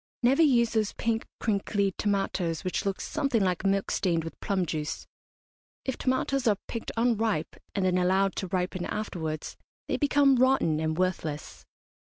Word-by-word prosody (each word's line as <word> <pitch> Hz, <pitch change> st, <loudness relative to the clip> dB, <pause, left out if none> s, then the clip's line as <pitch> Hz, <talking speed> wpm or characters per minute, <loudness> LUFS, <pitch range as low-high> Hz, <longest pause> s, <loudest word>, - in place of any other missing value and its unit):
Never 265 Hz, +6 st, +4 dB
use 240 Hz, -7 st, +4 dB
those 220 Hz, -2 st, 0 dB
pink, 225 Hz, -1 st, -1 dB
crinkly 200 Hz, -2 st, 0 dB
tomatoes 195 Hz, -5 st, -1 dB
which 185 Hz, +2 st, -1 dB
look 195 Hz, -, -1 dB
something 275 Hz, -8 st, 0 dB
like 185 Hz, -1 st, 0 dB
milk 195 Hz, 0 st, +1 dB
stained 170 Hz, -4 st, +1 dB
with 165 Hz, -, -8 dB
plum 190 Hz, -3 st, 0 dB
juice. 155 Hz, -1 st, -3 dB, 0.8 s
If 265 Hz, -, -1 dB
tomatoes 260 Hz, 0 st, 0 dB
are 210 Hz, -2 st, +4 dB
picked 230 Hz, -, -4 dB
unripe, 225 Hz, -7 st, +1 dB, 0.2 s
and 195 Hz, -2 st, +1 dB
then 180 Hz, 0 st, +2 dB
allowed 190 Hz, +2 st, +2 dB
to 190 Hz, -, -2 dB
ripen 180 Hz, 0 st, -2 dB
afterwards, 160 Hz, -7 st, -4 dB, 0.3 s
they -, -, 0 dB
become 285 Hz, -2 st, +4 dB
rotten 250 Hz, -12 st, +3 dB
and 160 Hz, 0 st, -1 dB
worthless. 175 Hz, -5 st, -2 dB
195 Hz, 155 wpm, -28 LUFS, 180-235 Hz, 0.8 s, Never